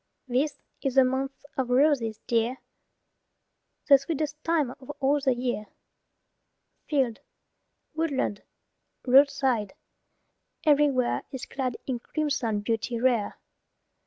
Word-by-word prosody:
This 265 Hz, +4 st, -1 dB, 0.2 s
is 270 Hz, -2 st, -1 dB
the 265 Hz, -, +7 dB
month 265 Hz, +2 st, -2 dB
of 260 Hz, -4 st, -1 dB
roses, 250 Hz, -5 st, +2 dB
dear, 235 Hz, +1 st, +1 dB, 1.3 s
The 275 Hz, -2 st, +8 dB
sweetest 300 Hz, +1 st, -3 dB
time 315 Hz, -6 st, +1 dB
of 260 Hz, -, -15 dB
all 280 Hz, +1 st, +2 dB
the 265 Hz, -2 st, +1 dB
year. 240 Hz, -4 st, -2 dB, 1.2 s
Field, 265 Hz, -7 st, +1 dB, 0.7 s
woodland, 300 Hz, -10 st, -1 dB, 0.6 s
roadside, 265 Hz, -5 st, +3 dB, 0.9 s
everywhere, 285 Hz, -4 st, +3 dB
Is 265 Hz, -3 st, -6 dB
clad 260 Hz, -2 st, -3 dB
in 255 Hz, -3 st, -2 dB
crimson 250 Hz, -7 st, -1 dB
beauty 230 Hz, +2 st, -2 dB
rare. 240 Hz, -4 st, +1 dB
265 Hz, 100 wpm, -27 LUFS, 240-285 Hz, 1.3 s, The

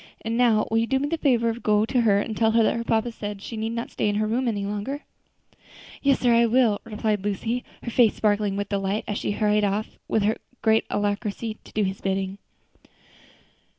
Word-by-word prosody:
And 225 Hz, +1 st, -2 dB
now 230 Hz, -3 st, +3 dB
will 225 Hz, -, +3 dB
you 230 Hz, -, 0 dB
do 265 Hz, -, +2 dB
me 285 Hz, +2 st, -1 dB
the 330 Hz, -, -1 dB
favor 235 Hz, -6 st, +2 dB
to 230 Hz, -, -9 dB
go 210 Hz, -2 st, +2 dB
to 245 Hz, +2 st, +1 dB
her 205 Hz, -3 st, +4 dB
and 220 Hz, +1 st, -3 dB
tell 220 Hz, +1 st, +2 dB
her 230 Hz, 0 st, +5 dB
that -, -, +2 dB
her 230 Hz, -, -2 dB
papa 230 Hz, +1 st, 0 dB
says 205 Hz, -2 st, -6 dB
she 230 Hz, -, -6 dB
need 220 Hz, +1 st, -3 dB
not 235 Hz, 0 st, -4 dB
stay -, -, 0 dB
in 205 Hz, -, -1 dB
her 215 Hz, +1 st, +1 dB
room 240 Hz, +4 st, 0 dB
any 205 Hz, -3 st, -1 dB
longer?" 210 Hz, +8 st, -4 dB, 1.0 s
"Yes, 275 Hz, -1 st, +3 dB
sir, 245 Hz, -2 st, +4 dB
I 235 Hz, 0 st, +5 dB
will," 230 Hz, -3 st, +3 dB
replied 215 Hz, -2 st, -1 dB
Lucy, 225 Hz, +4 st, -2 dB, 0.2 s
her 235 Hz, -, -4 dB
face 230 Hz, -2 st, +4 dB
sparkling 205 Hz, -2 st, +1 dB
with 205 Hz, 0 st, -3 dB
delight 195 Hz, +1 st, -1 dB
as 205 Hz, -, -2 dB
she -, -, -2 dB
hurried 210 Hz, 0 st, +2 dB
off 205 Hz, +2 st, -2 dB
with 220 Hz, -, +1 dB, 0.4 s
great 220 Hz, 0 st, +3 dB
alacrity 205 Hz, +2 st, -2 dB
to -, -, -15 dB
do 215 Hz, -, +1 dB
his 190 Hz, 0 st, -3 dB
bidding. 195 Hz, 0 st, -2 dB
220 Hz, 220 wpm, -25 LUFS, 205-235 Hz, 1.0 s, her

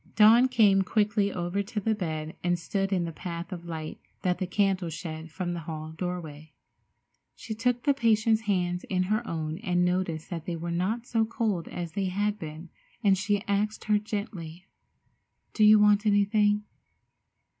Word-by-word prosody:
Dawn 225 Hz, +4 st, +7 dB
came 210 Hz, -6 st, +4 dB
quickly 205 Hz, +1 st, +1 dB
over 175 Hz, +2 st, -2 dB
to 210 Hz, +2 st, -4 dB
the 220 Hz, +2 st, +1 dB
bed 160 Hz, -5 st, -4 dB
and 175 Hz, 0 st, +2 dB
stood 195 Hz, +3 st, -2 dB
in 180 Hz, -3 st, +1 dB
the 165 Hz, -, -4 dB
path 170 Hz, +3 st, -6 dB
of 175 Hz, -2 st, -7 dB
light 160 Hz, -2 st, -6 dB, 0.2 s
that 180 Hz, -1 st, +1 dB
the 185 Hz, -, -2 dB
candle 190 Hz, -2 st, +1 dB
shed 160 Hz, 0 st, -6 dB
from 175 Hz, +2 st, -3 dB
the 170 Hz, -, -4 dB
hall 155 Hz, -1 st, -6 dB
doorway. 160 Hz, -3 st, -6 dB, 0.8 s
She 225 Hz, -, -6 dB
took 240 Hz, +2 st, 0 dB
the 285 Hz, -, +4 dB
patient's 225 Hz, -3 st, +2 dB
hands 180 Hz, -2 st, 0 dB
in 185 Hz, -1 st, 0 dB
her 215 Hz, +4 st, 0 dB
own 160 Hz, 0 st, -3 dB
and 180 Hz, -4 st, +1 dB
noticed 180 Hz, -3 st, -1 dB
that 165 Hz, -2 st, -5 dB
they 175 Hz, -, -2 dB
were 170 Hz, +1 st, -4 dB
not 200 Hz, +8 st, -1 dB
so 225 Hz, -2 st, +1 dB
cold 220 Hz, -6 st, -1 dB
as 175 Hz, -2 st, -5 dB
they 195 Hz, +4 st, -2 dB
had 205 Hz, +3 st, -1 dB
been, 160 Hz, +2 st, -8 dB, 0.3 s
and 200 Hz, -2 st, +5 dB
she 200 Hz, +2 st, 0 dB
asked 205 Hz, +2 st, -1 dB, 0.2 s
gently: 190 Hz, -5 st, -5 dB, 0.9 s
"Do 215 Hz, -, +2 dB
you 215 Hz, 0 st, +8 dB
want 210 Hz, 0 st, +4 dB
anything?" 205 Hz, 0 st, +3 dB
190 Hz, 170 wpm, -28 LUFS, 170-210 Hz, 0.9 s, you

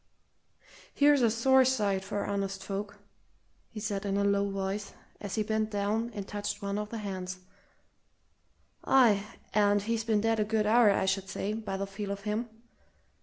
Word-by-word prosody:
"Here's 290 Hz, -1 st, +5 dB
a 235 Hz, -, +5 dB
sore 260 Hz, +4 st, +4 dB
sight 205 Hz, -7 st, +1 dB
for 205 Hz, +1 st, -3 dB
honest 195 Hz, -1 st, -3 dB
folk!" 205 Hz, +1 st, -5 dB, 0.7 s
he 220 Hz, -, -8 dB
said 205 Hz, -2 st, -3 dB
in 200 Hz, -1 st, -1 dB
a 200 Hz, -, +2 dB
low 200 Hz, 0 st, +2 dB
voice, 195 Hz, +1 st, -3 dB, 0.3 s
as 205 Hz, -2 st, -5 dB
he 215 Hz, -, +1 dB
bent 220 Hz, 0 st, -1 dB
down 215 Hz, +3 st, -1 dB
and 200 Hz, -2 st, -5 dB
touched 205 Hz, 0 st, -4 dB
one 200 Hz, 0 st, -3 dB
of 210 Hz, 0 st, -4 dB
the 230 Hz, -, -5 dB
hands. 185 Hz, -3 st, -5 dB, 1.5 s
"Aye, 225 Hz, -7 st, +4 dB, 0.3 s
and 205 Hz, -1 st, +3 dB
he's 225 Hz, +1 st, -1 dB
been 215 Hz, -2 st, +1 dB
dead 225 Hz, 0 st, +1 dB
a -, -, +3 dB
good 215 Hz, 0 st, 0 dB
hour, 225 Hz, +1 st, +5 dB
I 200 Hz, -, +2 dB
should 190 Hz, 0 st, -1 dB
say, 200 Hz, +2 st, -3 dB
by 215 Hz, -3 st, -4 dB
the 195 Hz, -, -2 dB
feel 200 Hz, +1 st, -6 dB
of 200 Hz, 0 st, -4 dB
him! 215 Hz, +3 st, -2 dB
205 Hz, 175 wpm, -30 LUFS, 200-220 Hz, 1.5 s, Here's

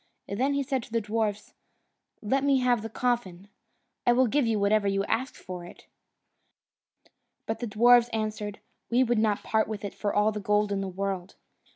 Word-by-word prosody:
Then 265 Hz, +8 st, 0 dB
he 280 Hz, -, +1 dB
said 265 Hz, -1 st, -1 dB
to 225 Hz, -, -13 dB
the 230 Hz, -, +1 dB
dwarfs, 210 Hz, -1 st, -2 dB, 0.7 s
"Let 265 Hz, +6 st, +1 dB
me 280 Hz, -1 st, +4 dB
have 245 Hz, -2 st, +2 dB
the 225 Hz, -, -6 dB
coffin! 205 Hz, -6 st, -2 dB, 0.5 s
I 240 Hz, -, +4 dB
will 255 Hz, +2 st, +4 dB
give 260 Hz, +2 st, +1 dB
you 225 Hz, -1 st, +1 dB
whatever 200 Hz, 0 st, +2 dB
you 195 Hz, 0 st, +1 dB
like 200 Hz, -, -5 dB
to -, -, +3 dB
ask 260 Hz, +3 st, -2 dB
for 180 Hz, -1 st, -8 dB
it." 175 Hz, -, -13 dB, 1.6 s
But 220 Hz, -, -3 dB
the 240 Hz, -, -3 dB
dwarfs 240 Hz, +3 st, +5 dB
answered, 215 Hz, -2 st, -4 dB, 0.3 s
"We 245 Hz, +2 st, +4 dB
would 240 Hz, -2 st, +1 dB
not 215 Hz, -2 st, +1 dB
part 220 Hz, 0 st, +1 dB
with 210 Hz, -1 st, -5 dB
it 200 Hz, -, -5 dB
for 205 Hz, -, -2 dB
all 210 Hz, +1 st, +2 dB
the 210 Hz, -, -4 dB
gold 210 Hz, +1 st, +1 dB
in 195 Hz, -1 st, -1 dB
the 195 Hz, -, -3 dB
world." 190 Hz, 0 st, -4 dB
215 Hz, 200 wpm, -27 LUFS, 200-240 Hz, 1.6 s, dwarfs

